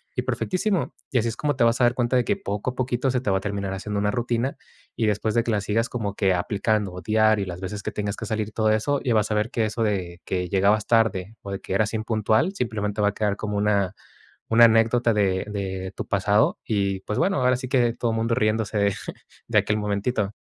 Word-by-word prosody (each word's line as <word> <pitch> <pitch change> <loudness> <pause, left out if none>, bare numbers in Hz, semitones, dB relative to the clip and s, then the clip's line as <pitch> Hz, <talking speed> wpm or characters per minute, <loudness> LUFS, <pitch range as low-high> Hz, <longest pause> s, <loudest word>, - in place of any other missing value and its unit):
Y - - 0
perfectísimo, 190 0 -1 0.2
y 130 - +1
así 115 - 0
es 115 - -5
como 145 -1 0
te - - +2
vas 115 +2 +3
a - - +6
dar 120 0 +2
cuenta 120 0 0
de 125 - +4
que, - - +1
poco 105 +5 -3
a - - -15
poquito, 125 +1 0
se 125 - +1
te 100 - 0
va 95 - +3
a - - -12
terminar 100 -1 -3
haciendo 105 +2 -4
una 105 0 +1
rutina 120 +3 -1 0.4
y 110 - 0
después 105 +1 0
de 115 - +3
que 115 - -4
la 105 - +1
sigas 110 +3 0
como 105 -5 -3
que 95 -3 +2
aplicando 100 +1 0
o 90 - -7
diario 110 +1 +3
las 90 0 -6
veces 105 +2 -5
que - - -3
tengas 105 0 -3
que 110 - -6
salir 110 -1 -1
y - - -18
todo 110 0 +1
eso, 140 +7 +1
y 125 - 0
vas 110 -1 +1
a - - +1
ver 105 +2 0
que 115 - +1
eso 110 +2 -3
de 90 -4 -2
que 90 -2 -2
llegabas 100 +2 +2
tarde 110 -3 +1
o 100 - -9
de 100 - -4
que - - -5
eras 105 +3 +1
impuntual, 110 - +1
simplemente, 105 - -2
va 105 - +3
a - - -5
quedar 105 -2 0
como 105 -1 -3
una 100 -2 +1 0.5
una 115 +1 +7
anécdota 115 +1 +3
de 95 -2 +1
de 95 -2 -4
tu - - -5
pasado. 100 +2 +2
Y, 100 -3 0
pues, 105 - -3
bueno, 185 -2 +2
ahora 125 0 +3
sí 130 0 -6
que 120 -3 +2
todo 120 -1 -1
mundo 115 +1 0
riéndose 110 0 0
de 100 -1 +2 0.5
de - - +1
aquel 105 - 0
momentito. 105 0 -1
105 Hz, 245 wpm, -24 LUFS, 100-115 Hz, 0.5 s, una